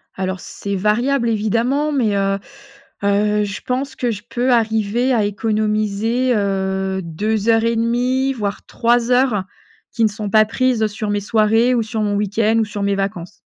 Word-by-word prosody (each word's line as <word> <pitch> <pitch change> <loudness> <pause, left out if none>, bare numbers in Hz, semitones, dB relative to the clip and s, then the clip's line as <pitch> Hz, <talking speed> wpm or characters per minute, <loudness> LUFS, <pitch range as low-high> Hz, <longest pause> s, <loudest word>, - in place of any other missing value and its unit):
Alors, 190 0 -3
c'est 200 +2 -5
variable 235 +6 +1
évidemment. 235 +7 0
Mais, 235 -8 +1
heu 195 0 0 0.6
heu, 210 +1 +2
je 195 -1 -6
pense 265 +2 -3
que 245 -2 -1
je 205 -2 -6
peux 250 +2 0
arriver 225 +2 +1
à 225 -3 +2
économiser, 215 +3 0
heu, 190 -1 -1
2 210 +6 -2
heures 225 0 +4
et 230 0 +1
demi 250 +4 +1
voire 210 -5 -4
3 235 +1 +1
heures 245 -6 +2 0.5
qui 230 - 0
ne 220 - +4
sont 210 0 -5
pas 215 +1 +5
prises 235 0 +1
sur 215 0 -5
mes 205 0 0
soirées 225 +3 +2
ou 235 - +2
sur 220 0 -3
mon 205 -1 0
week-end 210 +2 +1
ou 220 - +2
sur 205 -1 -5
mes 200 0 +1
vacances. 195 -2 -3
215 Hz, 175 wpm, -19 LUFS, 200-235 Hz, 0.6 s, pas